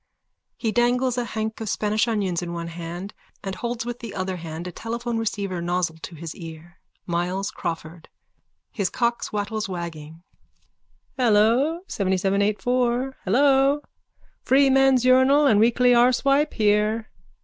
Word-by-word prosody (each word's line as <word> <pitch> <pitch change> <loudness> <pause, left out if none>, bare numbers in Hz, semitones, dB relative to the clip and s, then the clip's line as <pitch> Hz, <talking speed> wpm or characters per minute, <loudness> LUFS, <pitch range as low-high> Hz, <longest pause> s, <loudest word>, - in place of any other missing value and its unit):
He 225 - -1
dangles 245 +2 +2
a 240 - -2
hank 220 0 -4
of 220 - -3
Spanish 215 +3 0
onions 195 -6 -1
in 175 -1 -5
one 170 0 -5
hand 170 +3 -7 0.3
and 195 -1 -4
holds 235 +3 -4
with 240 0 -5
the 230 -4 -8
other 185 -1 -3
hand 165 0 -7
a 180 - -5
telephone 235 +4 -4
receiver 200 -5 -3
nozzle 175 -1 -1
to 165 - -9
his 165 0 -7
ear.)_ 165 0 -10 0.3
MYLES 180 +4 -2
CRAWFORD: 165 0 -6 0.6
(His 200 -4 -1
cock's 235 -1 -1
wattles 210 0 -3
wagging.) 165 -2 -7 0.9
Hello, 245 +7 +3
seventyseven 195 0 0
eightfour. 245 +5 0
Hello. 275 +6 +3 0.6
Freeman's 270 -1 +4
Urinal 260 +3 +5
and 220 -7 +4
Weekly 240 +3 +4
Arsewipe 275 +5 +3
here. 215 +1 +1
215 Hz, 135 wpm, -24 LUFS, 180-245 Hz, 0.9 s, Urinal